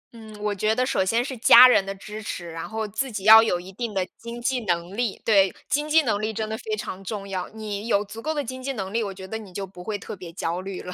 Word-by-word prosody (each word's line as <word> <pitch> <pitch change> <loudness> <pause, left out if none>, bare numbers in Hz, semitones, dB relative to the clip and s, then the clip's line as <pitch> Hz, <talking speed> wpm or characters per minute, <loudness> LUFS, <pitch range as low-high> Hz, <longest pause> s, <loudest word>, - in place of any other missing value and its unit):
嗯， 220 -1 -11
我 210 -1 0
觉 215 +3 0
得 255 +1 +1
首 190 - +1
先 230 +6 +1
是 265 -1 -5
家 245 +1 +9
人 245 - +4
的 195 0 -5
支 210 +2 -8
持， 175 -5 -6
然 165 0 -6
后 220 0 -3
自 250 +6 -3
己 200 -3 -5
要 220 +1 +10
有 180 -6 0
一 185 +2 -10
定 220 0 -5
的 185 - +1
经 235 +1 -7
济 255 +1 0
能 175 +1 -1
力。 235 -3 -1
对， 195 -4 +4 0.2
经 295 +1 -1
济 320 0 +5
能 215 -4 0
力 215 +1 -1
真 220 0 -3
的 220 - -3
非 220 -1 -4
常 195 -2 -6
重 200 0 -5
要， 185 -2 -4
你 215 0 -6
有 205 -2 +2
足 220 +3 -9
够 310 - -2
的 295 -2 -1
经 255 +2 -7
济 270 +1 -3
能 195 -3 -5
力， 230 -1 +1
我 200 - -4
觉 190 0 -9
得 220 +3 -5
你 205 -4 -12
就 195 +2 -4
不 180 -1 -12
会 210 +2 -3
特 205 - -8
别 180 -3 -10
焦 170 0 -3
虑 190 0 -6
了。 180 - -7
210 Hz, 315 characters per minute, -24 LUFS, 190-230 Hz, 0.2 s, 要